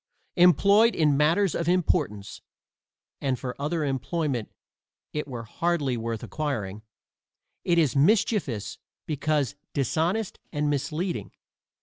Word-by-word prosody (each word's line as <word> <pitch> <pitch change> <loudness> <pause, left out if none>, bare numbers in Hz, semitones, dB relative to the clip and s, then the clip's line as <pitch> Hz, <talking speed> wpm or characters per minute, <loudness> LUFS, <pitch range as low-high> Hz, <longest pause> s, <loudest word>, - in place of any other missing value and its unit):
Employed 200 +5 +5
in 150 -3 +3
matters 165 +6 +3
of 170 0 -1
importance 140 - 0 0.8
(and 135 -2 0
for 125 0 -5
other 155 +2 -1
employment 135 -2 -2 0.6
it 150 -1 -3
were 120 -4 -6
hardly 145 +2 -1
worth 115 -1 -4
acquiring) 110 -10 -3 0.8
it 175 -1 +2
is 155 -6 +3
mischievous 165 - +1 0.3
because 150 -4 0 0.2
dishonest 165 - 0
and 150 -1 0
misleading. 160 +5 -2
150 Hz, 105 wpm, -26 LUFS, 130-175 Hz, 0.8 s, Employed